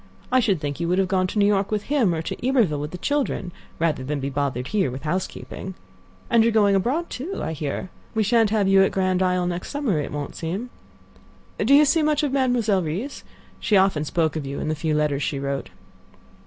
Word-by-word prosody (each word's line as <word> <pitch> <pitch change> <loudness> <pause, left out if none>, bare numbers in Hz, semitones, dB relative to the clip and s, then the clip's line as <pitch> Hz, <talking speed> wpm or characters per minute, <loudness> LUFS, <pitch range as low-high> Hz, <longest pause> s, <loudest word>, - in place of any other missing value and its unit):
I 255 - +5
should 200 -8 +1
think 145 -1 -4
you 170 - -1
would 180 +2 +1
have 190 -1 +2
gone 185 -1 +1
to 215 - -5
New 205 - +4
York 200 -1 +2
with 210 -1 -1
him, 240 - +2
or 160 - -3
to 245 - -4
Iberville 220 - +2
with 150 +1 -4
the 180 - -7
children, 275 -7 -1 0.3
rather 160 -5 0
than 145 +2 -2
be 140 +1 -3
bothered 135 -2 -2
here 195 -9 +1
with 130 +3 -7
housekeeping. 185 +2 -4 0.5
And 230 -1 +4
you 230 - +4
are - - 0
going 205 -2 +4
abroad, 260 - 0
too, 320 +10 -4
I - - -2
hear. 150 +4 -4 0.2
We 220 - +2
shan't 225 +1 +3
have 210 -2 +2
you 195 0 +6
at 195 - +3
Grand 185 -1 +1
Isle 180 -1 +1
next 175 0 -3
summer; 275 - 0
it 145 - -4
won't 145 -1 -5
seem—do 210 +5 -5
you 300 +1 +7
see 315 +3 +3
much 300 0 +1
of 290 - 0
Mademoiselle 245 -7 +2
Reisz? 180 - -4 0.4
She 210 - +3
often 190 -6 +3
spoke 160 0 0
of 155 - -2
you 140 - -4
in - - -2
the 155 - 0
few 155 0 -1
letters 150 -2 +1
she 145 - -1
wrote." 140 0 -3
190 Hz, 225 wpm, -23 LUFS, 155-225 Hz, 0.5 s, you